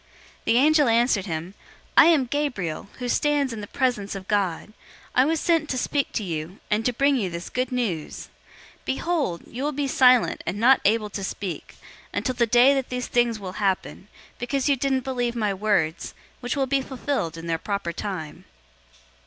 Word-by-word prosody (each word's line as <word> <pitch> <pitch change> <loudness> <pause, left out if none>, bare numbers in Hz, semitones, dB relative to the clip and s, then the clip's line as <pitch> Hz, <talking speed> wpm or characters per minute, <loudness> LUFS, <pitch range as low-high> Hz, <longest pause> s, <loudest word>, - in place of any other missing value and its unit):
001:019 - - -32 0.4
The 230 - +3
angel 295 +1 +5
answered 230 -3 +2
him, 165 +2 -4 0.4
"I - - +9
am 310 -6 +4
Gabriel, 235 - -3
who 250 - -4
stands 285 0 +1
in 220 - -6
the 205 - -7
presence 215 -7 -1
of 190 -1 -8
God. 205 -1 -1 0.4
I 255 - +4
was 320 +1 +1
sent 330 -3 +1
to 255 - -1
speak 280 +2 -1
to 220 - -1
you, 165 +1 -5
and 210 +1 +2
to - - +2
bring 275 +3 +2
you 200 -7 -1
this 170 0 -7
good 255 0 -1
news. 210 -12 -3 0.5
001:020 - - -33
Behold, 275 - -1
you 250 - -7
will 295 - 0
be 285 -1 -2
silent 255 -2 +4
and 200 - -2
not 255 +4 +5
able 215 0 +2
to 195 - -5
speak, 190 -1 -5 0.4
until 255 - -1
the 240 -1 +1
day 245 +4 +6
that 270 -2 -2
these 250 0 -3
things 240 -2 +1
will 190 -2 -7
happen, 195 0 -1 0.3
because 260 +3 -1
you 285 - +4
didn't 265 0 0
believe 245 -2 -2
my 210 -4 0
words, 195 -5 -1 0.2
which 245 -1 -3
will 270 - +2
be 270 +1 +1
fulfilled 260 - -3
in 165 - -8
their 165 -1 -1
proper 200 -4 -3
time." 170 -5 -6
240 Hz, 195 wpm, -24 LUFS, 195-265 Hz, 0.5 s, I